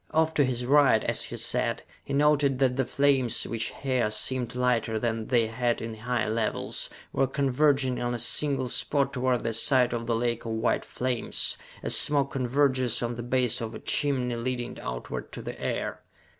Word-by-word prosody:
Off 160 0 +1
to 145 - +3
his 125 -2 -2
right, 135 -4 +4
as - - 0
he - - -6
sat, - - 0 0.2
he - - -9
noted 145 -1 +3
that 130 -1 +2
the 130 -1 -1
flames, 135 -4 +2
which 115 -1 -2
here 130 -5 +1
seemed 125 +2 0
lighter 120 -3 0
than 115 -1 -2
they 120 -3 +3
had 120 +1 -1
in 115 0 -5
high 115 +1 -2
levels, 110 0 -2 0.2
were 135 - +2
converging 135 -1 +1
on 120 0 -1
a - - -2
single 130 +2 +1
spot 140 +2 +1
toward 125 -1 0
the 115 - -1
side 125 +1 +3
of 115 -1 -4
the 115 - +1
lake 120 0 -1
of 115 - -4
white 110 +2 0
flames 125 -2 -1 0.3
as - - +4
smoke 140 -2 +4
converges 130 -2 +1
on 120 0 -2
the 120 - -5
base 125 0 0
of 115 -1 -5
a - - -7
chimney 130 -4 0
leading 120 +1 -3
outward - - -6
to - - -8
the - - -8
air! - - -3
125 Hz, 185 wpm, -27 LUFS, 115-135 Hz, 0.3 s, right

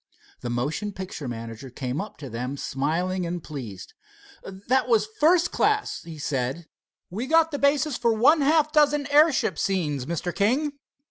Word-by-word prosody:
The 120 - -5
motion 145 - -2
picture 180 -7 -6
manager 115 +1 -7
came 125 +4 -3
up 210 - -9
to 145 - -8
them 125 +4 -4
smiling 175 +8 -1
and 175 -1 -4
pleased. 115 - -8 0.5
"That 205 +8 -1
was 220 -3 +3
first 340 +3 +4
class," 425 0 0
he 165 -2 -10
said. 140 +2 -2 0.5
"We 225 +8 -4
got 325 +1 +4
the 290 - -3
basis 280 -1 +2
for 235 -1 +2
one 270 +8 +4
half 305 +1 +3
dozen 295 -1 +3
airship 300 0 +4
scenes, 155 -9 -1
Mr. 170 +1 -3
King. 280 +8 0
190 Hz, 155 wpm, -25 LUFS, -, 0.5 s, first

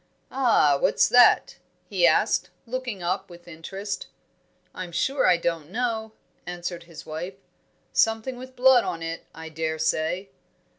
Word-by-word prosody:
"Ah, 225 - +3
what's - - +3
that?" 245 0 +5 0.3
he - - +3
asked, - - +2 0.2
looking 240 -6 -4
up 185 +3 -2
with 175 0 -14
interest. 195 +5 -6 0.7
"I'm 180 -2 -6
sure 270 - +1
I 180 -1 +5
don't 165 -3 -2
know," 225 0 -2 0.3
answered 175 -1 -5
his 165 -3 -11
wife. 165 +5 -6 0.6
"Something 225 +3 +1
with 255 +1 -11
blood 255 -1 +6
on 165 -1 -4
it, 165 0 -5
I 160 0 -8
dare 160 0 -3
say." 165 +5 -1
180 Hz, 140 wpm, -25 LUFS, 165-230 Hz, 0.7 s, blood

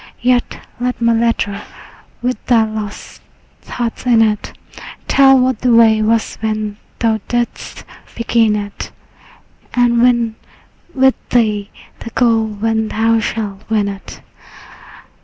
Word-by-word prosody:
Yet 245 0 +1 0.2
let 250 -1 -2
my 235 0 +3
letter 225 -3 0 0.6
with 250 +1 -2
thy 235 -3 +4
lost 215 -1 -7 0.4
thoughts 235 -2 -4
in 230 -2 +5
it 210 -2 -1 0.6
Tell 270 -1 +6
what 255 -3 +1
the 245 -2 +3
way 220 -2 +5
was 220 +1 0
when 215 -1 -2 0.2
thou 225 -2 +1
didst 240 -1 -3 0.3
begin 230 -2 +2
it, 205 -1 -5 0.9
And 240 -1 +3
win 235 -2 +2 0.6
with 265 0 +4 0.2
thee 215 -4 +1 0.3
the - - -7
goal 230 -2 +2
when 220 +1 -1
thou 225 +1 +1
shalt 205 -3 -4
win 215 -2 +1
it. 195 -1 -9
225 Hz, 120 wpm, -16 LUFS, 215-240 Hz, 0.9 s, Tell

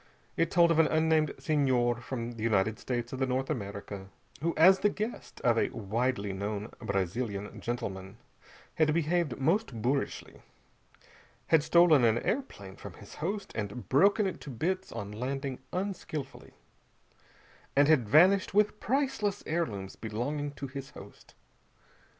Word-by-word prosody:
It 165 0 +1
told 170 -1 +5
of 165 - +3
an 160 - +6
unnamed 160 -1 +2
Senhor 130 -7 +1
from 120 -1 -4
the 115 -2 -9
United 110 -1 +1
States 120 -1 -3
of 130 - -4
the 135 - +1
North 130 +3 -1
America, 100 -5 -6 0.3
who 165 +2 0
as 185 +4 +7
the 210 - +3
guest 215 +3 -5
of 115 -2 +3
a - - +1
widely 110 -1 -2
known 100 +2 -4
Brazilian 100 +2 -3
gentleman 95 -4 -5 0.6
had 155 -1 +2
behaved 170 -4 0
most 160 - 0
boorishly, 135 +3 -2 1.1
had 160 -2 +5
stolen 165 -3 +5
an 115 -1 +4
airplane 110 - -3
from - - -9
his - - -13
host 195 +6 -4
and 105 +3 -5
broken 200 +9 +4
it 190 - -3
to - - -8
bits 185 +10 -2
on 105 -3 -6
landing 130 +4 -4
unskilfully, 175 -7 -5 1.2
and 140 +1 +5
had 135 -9 +3
vanished 185 - +5
with 210 0 +3
priceless 240 -5 -1
heirlooms 110 - -2
belonging 125 +7 -3
to 140 - -6
his 135 0 -7
host. - - -14
135 Hz, 145 wpm, -30 LUFS, 115-170 Hz, 1.2 s, as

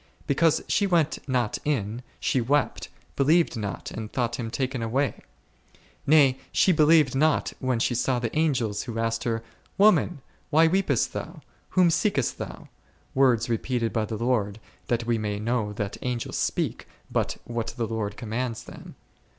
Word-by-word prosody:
Because 155 +3 +2
she 200 - +2
went 165 -5 +2
not 125 -4 0
in, 120 -5 -1 0.2
she 130 - +1
wept, 140 +5 0 0.3
believed 155 +2 +3
not 105 -4 -5
and 110 -1 -6
thought 120 -2 -1
Him 115 -2 -4
taken 130 +1 -2
away; 130 +5 -1 0.9
nay! 140 -3 +5
she 190 - +4
believed 155 -4 +5
not 150 +3 +2
when 130 -2 0
she 120 +2 +1
saw 125 +1 +1
the 120 0 -3
Angels 130 -10 +1
who 115 -3 -6
asked 115 0 -1
her, 115 -1 -1 0.3
Woman! 195 -8 +4 0.3
why 160 +2 +5
weepest 190 +4 +1
thou? - - -6 0.3
whom 180 -2 +4
seekest 160 - 0
thou? - - -7 0.5
words 125 -4 +3
repeated 115 0 -1
by 110 -2 0
the 110 +1 -4
Lord, 110 -3 0 0.3
that 120 -1 0
we 115 -1 +1
may 105 -1 -2
know 110 -1 -1
that 105 -1 -4
Angels 125 -2 -3
speak - - -1 0.2
but - - -1
what 115 -1 -3
the 115 - 0
Lord 105 -2 -3
commands 115 +1 -3
them. - - -12
125 Hz, 160 wpm, -26 LUFS, 115-145 Hz, 0.9 s, nay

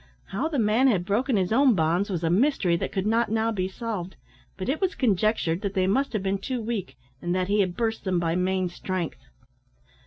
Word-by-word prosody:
How 245 +11 -1
the 315 -3 -2
man 225 +3 +3
had 190 -8 +2
broken 225 +5 +1
his 185 +2 0
own 260 -1 +5
bonds 170 +4 +1
was 175 -4 -2
a 165 - +1
mystery 195 - +2
that - - -3
could 190 0 -2
not 225 +1 +2
now 225 +1 +1
be 185 -4 -1
solved, 190 -2 -5 0.4
but 190 - -4
it 285 +7 -1
was 380 -1 0
conjectured 210 -6 +1
they 195 -2 0
must 265 +9 +1
have 210 -3 -1
been 195 0 0
too 250 +5 -3
weak, 215 - -4 0.2
and 175 +1 -1
that 185 0 -1
he 205 +1 +2
had 185 -3 0
burst 225 -1 -1
them 185 -2 0
by 165 -1 0
main 185 0 +1
strength. 175 - -5
200 Hz, 215 wpm, -26 LUFS, 185-230 Hz, 0.4 s, own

